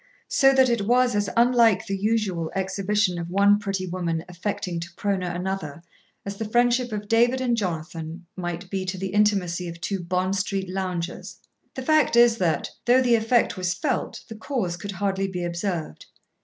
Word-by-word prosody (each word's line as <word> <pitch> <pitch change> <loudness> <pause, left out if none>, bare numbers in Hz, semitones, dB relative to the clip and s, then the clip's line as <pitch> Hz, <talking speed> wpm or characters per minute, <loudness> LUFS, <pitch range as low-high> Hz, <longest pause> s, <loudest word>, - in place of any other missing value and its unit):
So 270 0 +5
that 265 -1 +5
it 235 -5 0
was 245 -1 +3
as 205 -1 0
unlike 235 -3 +4
the 195 -2 -2
usual 195 -5 -1
exhibition 190 -1 0
of 170 0 -5
one 200 +2 +4
pretty 195 -2 -3
woman 170 -2 -3
affecting 180 0 -4
to 170 +1 -7
proner 195 -3 -1
another 175 -4 -4 0.4
as 200 0 -5
the 220 0 -4
friendship 245 +1 +2
of 210 -1 -4
David 240 +4 +3
and 250 -2 +1
Jonathan 165 -3 -4
might 175 0 -5
be 190 -1 -1
to 185 0 -4
the 190 +1 -3
intimacy 195 -4 +1
of 170 0 -8
two 195 +2 -2
Bond 180 +2 -1
Street 195 0 -2
loungers. 185 -2 -4 0.4
The 260 - -5
fact 310 -2 +3
is 235 -1 +5
that, 165 -5 0
though 250 +2 +5
the 245 -1 +3
effect 230 +1 +2
was 180 -1 -1
felt, 260 - -2
the - - -8
cause 220 -5 -3
could 200 +3 -6
hardly 195 0 -1
be 180 -2 -4
observed. 170 - -4
195 Hz, 180 wpm, -24 LUFS, 180-225 Hz, 0.4 s, So